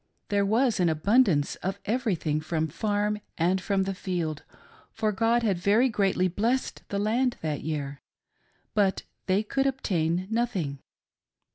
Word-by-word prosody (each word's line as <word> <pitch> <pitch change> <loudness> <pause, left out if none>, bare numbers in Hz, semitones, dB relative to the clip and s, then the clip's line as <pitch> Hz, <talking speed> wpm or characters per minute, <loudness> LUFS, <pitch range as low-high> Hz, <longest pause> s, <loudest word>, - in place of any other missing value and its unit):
There 200 -1 +2
was 230 +1 +2
abund 180 +9 +4
ance 145 -6 0
of 190 +2 -3
everything 195 -10 0
from 160 0 -1
the 155 - -8
farm 210 +1 0 0.2
and 180 +3 +2
from 195 0 +1
the 195 - -2
iield, 175 -5 -3 0.5
for 215 -1 0
God 230 +3 +2
had 195 -6 +1
very 215 +8 +4
greatly 195 -4 +2
blessed 230 +9 -1
the 200 - -2
land 235 +5 +1
that 155 -2 -2
year; 145 -3 -4 0.7
but 200 -3 +2 0.2
they 195 +3 +2
could 270 +5 0
obtain 185 - 0
nothing. 200 - -1
195 Hz, 145 wpm, -27 LUFS, 170-225 Hz, 0.7 s, abund